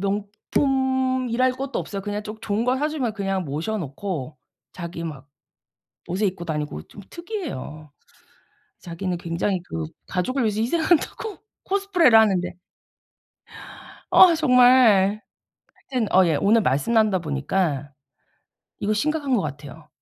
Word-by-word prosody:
명품이랄 255 +5 0
것도 270 +2 -4
없어요. 200 -1 -5
그냥 205 +1 -4
좀 215 +1 -8
좋은 215 +1 -1
걸 250 +1 +1
사주면 295 -6 -1
그냥 195 -2 -2
모셔 160 +10 -3
놓고 155 -2 -5 0.4
자기 170 -1 -6
막 145 -4 -8 0.8
옷을 195 +4 0
입고 180 -2 -5
다니고 150 - -4
좀 205 - -13
특이해요. 295 - -7 0.9
자기는 180 +1 -4
굉장히 175 +3 -2
그 80 - -5 0.2
가족을 250 +9 -1
위해서 215 -1 0
희생한다고 340 - 0 0.3
코스프레를 370 - +4
하는데 195 -5 +2 1.6
아 355 -3 +7
정말 245 -8 +5 0.7
하여튼 245 -6 -1
어 185 0 +6
예 160 -3 +2
오늘 220 +7 +3
말씀 135 - 0
나누다 215 -5 +3
보니까 145 -1 -2 0.9
이거 210 +1 0
심각한 290 +4 -1
것 205 - +1
같아요. 150 +1 -8
205 Hz, 275 characters per minute, -23 LUFS, 170-255 Hz, 1.6 s, 아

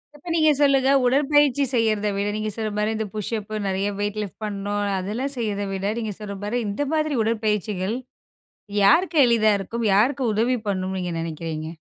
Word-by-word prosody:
இப்ப, 310 +4 -11
நீங்க 310 -2 +4
சொல்லுங்க. 270 -2 +4 0.2
உடற்பயிற்சி 285 +1 +3
செய்யறத 215 -3 +1
விட, 200 +1 -1
நீங்க 215 0 -2
சொல்ற 220 -2 -3
மாரி, 210 +1 0
இந்த 220 0 -2
புஷ்அப் 215 0 -4
நெறைய 195 +1 0
வெயிட் 205 +1 -2
லிஃப்ட் 200 - -9
பண்ணும். 205 0 -2
அதெல்லாம் 220 +9 -3
செய்றத 205 -3 -2
விட, 195 0 -3
நீங்க 220 -2 -3
சொல்ற 205 -1 -6
மாரி 220 +4 -1
இந்த 205 +8 -2
மாதிரி 310 -1 +1
உடற்பயிற்சிகள், 215 -2 -1 0.9
யாருக்கு 330 - +4
எளிதா 225 -3 +4
இருக்கும்? 230 +4 -4
யாருக்கு 255 +7 +3
உதவி 235 +4 +1
பண்ணும் 190 -1 -2
நீங்க 180 -1 -3
நெனைக்கிறீங்க? 160 -1 -4
215 Hz, 165 wpm, -23 LUFS, 200-250 Hz, 0.9 s, நீங்க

